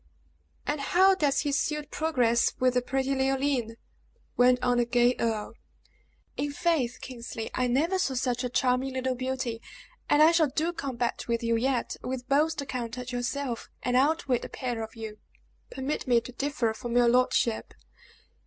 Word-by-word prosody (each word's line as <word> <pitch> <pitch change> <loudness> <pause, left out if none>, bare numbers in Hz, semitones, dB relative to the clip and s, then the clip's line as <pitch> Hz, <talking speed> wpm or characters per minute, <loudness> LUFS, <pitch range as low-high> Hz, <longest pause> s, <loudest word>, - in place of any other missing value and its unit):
"And 295 0 -1
how 375 +6 +5
does 290 -7 +1
his 290 -1 0
suit 300 -1 -2
progress 245 -7 +2
with 255 -1 +3
the 250 - +2
pretty 265 +2 -1
Leoline?" 265 -3 0 0.6
went 250 0 +5
on 245 -1 +2
the 240 - +3
gay 240 +1 +3
earl. 220 -2 -1 0.8
"In 290 0 -1
faith, 290 -7 0
Kingsley, 235 -3 -6
I 250 - +1
never 320 +10 +1
saw 275 -7 0
such 250 -1 -1
a 250 - -1
charming 255 +2 +1
little 260 0 0
beauty; 255 -2 -3 0.5
and 295 +1 +6
I 320 - +7
shall 330 -4 +3
do 315 +5 -1
combat 255 -6 -3
with 235 0 -1
you 230 0 +2
yet 250 +1 0
with 255 0 -5
both 305 +3 +2
the 280 - -4
count 245 -2 -4
and 250 0 -6
yourself, 245 0 -3
and 250 0 0
outwit 270 -2 +2
the - - -7
pair 245 -4 -4
of 220 +1 -7
you!" 220 -2 -7 0.5
"Permit 270 +2 -3
me 240 -2 +5
to 240 - -10
differ 265 -3 -1
from 240 +2 -3
your 240 -1 +5
lordship. 245 -2 +1
255 Hz, 170 wpm, -28 LUFS, 240-280 Hz, 0.8 s, I